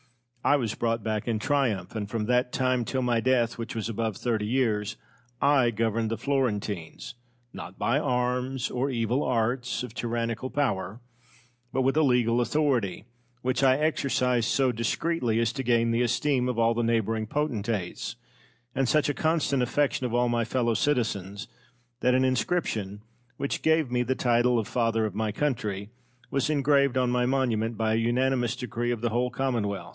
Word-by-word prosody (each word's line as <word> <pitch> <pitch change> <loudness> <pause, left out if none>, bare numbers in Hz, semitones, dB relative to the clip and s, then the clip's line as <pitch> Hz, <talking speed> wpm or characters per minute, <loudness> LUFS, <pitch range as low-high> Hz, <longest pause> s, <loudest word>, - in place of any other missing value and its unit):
I 145 - +4
was 115 -6 -1
brought 115 -2 -1
back 110 0 -2
in 115 -2 +1
triumph, 120 -6 0
and 105 -2 -3
from 110 -1 -2
that 125 +1 +1
time 130 -2 +1
till 130 +2 -2
my 120 -2 +2
death, 120 -1 +1
which 115 0 -5
was 110 -1 -2
above 115 -2 -2
thirty 110 -4 -1
years, 115 -4 0 0.4
I 140 -4 +4
governed 115 0 0
the 115 - -2
Florentines, 110 - -2 0.4
not 95 - -9
by 125 +5 +1
arms 125 -1 -1
or 130 +3 -1
evil 120 +2 0
arts 125 +2 0
of 125 -3 -7
tyrannical 115 +1 -2
power, 105 -8 -1 0.7
but 130 - 0
with 135 +2 +2
a 155 - +4
legal 125 -4 +3
authority, 120 - 0 0.4
which 130 +1 0
I 130 -1 +5
exercised 130 -6 +1
so 135 -2 +2
discreetly 115 +1 0
as 115 0 +1
to 135 - -3
gain 115 -2 +2
the 115 +1 +1
esteem 125 +1 +1
of 125 - -2
all 115 0 +3
the 120 - -1
neighbouring 115 -1 0
potentates, 115 -9 -2 0.6
and 135 -2 0
such 155 -1 +3
a - - +1
constant 155 -4 +1
affection 140 +1 +1
of 120 - -6
all 120 0 +3
my 120 -1 +1
fellow 120 0 0
citizens 105 -5 -1 0.5
that 125 0 +3
an 130 0 +3
inscription, 115 - -1 0.3
which 140 - -2
gave 160 -4 +2
me 125 0 +1
the 125 +2 0
title 120 0 +2
of 110 -2 -1
Father 115 -3 +1
of 105 - -3
my 110 +1 -1
Country, 105 -6 -2 0.4
was 135 +1 0
engraved 140 -3 +3
on 125 -1 +2
my 125 0 +1
monument 120 -4 0
by 110 -1 +1
an 110 - +2
unanimous 120 0 +1
decree 120 -1 -3
of 120 -2 -2
the 120 - 0
whole 120 +2 0
Commonwealth. 110 -9 -2
120 Hz, 175 wpm, -27 LUFS, 115-130 Hz, 0.7 s, I